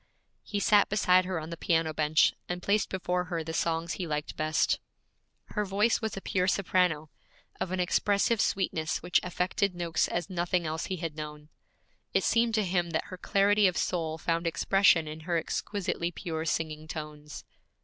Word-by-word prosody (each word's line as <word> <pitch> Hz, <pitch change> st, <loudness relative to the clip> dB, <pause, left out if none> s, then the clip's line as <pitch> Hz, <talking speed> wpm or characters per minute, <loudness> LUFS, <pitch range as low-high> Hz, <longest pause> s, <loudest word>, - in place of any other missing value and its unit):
He 205 Hz, -, -3 dB
sat 205 Hz, 0 st, +4 dB
beside 185 Hz, -3 st, +4 dB
her 185 Hz, -2 st, -2 dB
on 160 Hz, +1 st, -7 dB
the 170 Hz, -, -5 dB
piano 165 Hz, -3 st, +1 dB
bench, 155 Hz, +1 st, +3 dB, 0.2 s
and 180 Hz, 0 st, -3 dB
placed 205 Hz, +1 st, +1 dB
before 180 Hz, -1 st, -1 dB
her 170 Hz, -2 st, -3 dB
the 160 Hz, +1 st, -5 dB
songs 165 Hz, 0 st, -1 dB
he 180 Hz, -, -4 dB
liked 150 Hz, -1 st, -3 dB
best. 155 Hz, +1 st, +1 dB, 0.7 s
Her 210 Hz, -, -1 dB
voice 205 Hz, +4 st, +1 dB
was 220 Hz, -2 st, -3 dB
a -, -, -4 dB
pure 185 Hz, -1 st, 0 dB
soprano, 180 Hz, -6 st, +1 dB, 0.5 s
of 185 Hz, -, -2 dB
an 185 Hz, -, -1 dB
expressive 200 Hz, +4 st, +2 dB
sweetness 160 Hz, -5 st, -1 dB
which 180 Hz, -, +3 dB
affected 180 Hz, +1 st, -1 dB
Noakes 170 Hz, -2 st, 0 dB
as 175 Hz, -2 st, -2 dB
nothing 175 Hz, -1 st, -1 dB
else 160 Hz, +1 st, -2 dB
he 190 Hz, -, -3 dB
had 165 Hz, -3 st, -5 dB
known. 150 Hz, -1 st, -8 dB, 0.7 s
It -, -, +3 dB
seemed 230 Hz, -1 st, +2 dB
to 215 Hz, -2 st, +2 dB
him 175 Hz, -1 st, 0 dB
that 160 Hz, -1 st, -2 dB
her 185 Hz, -, -6 dB
clarity 200 Hz, +2 st, +3 dB
of 180 Hz, -, -1 dB
soul 160 Hz, -3 st, -1 dB
found 165 Hz, +1 st, -1 dB
expression 165 Hz, -1 st, +3 dB
in 155 Hz, +1 st, -6 dB
her 170 Hz, +2 st, -1 dB
exquisitely 170 Hz, +1 st, -2 dB
pure 165 Hz, -2 st, -4 dB
singing 155 Hz, -1 st, -2 dB
tones. 150 Hz, -2 st, -7 dB
175 Hz, 180 wpm, -29 LUFS, 160-190 Hz, 0.7 s, sat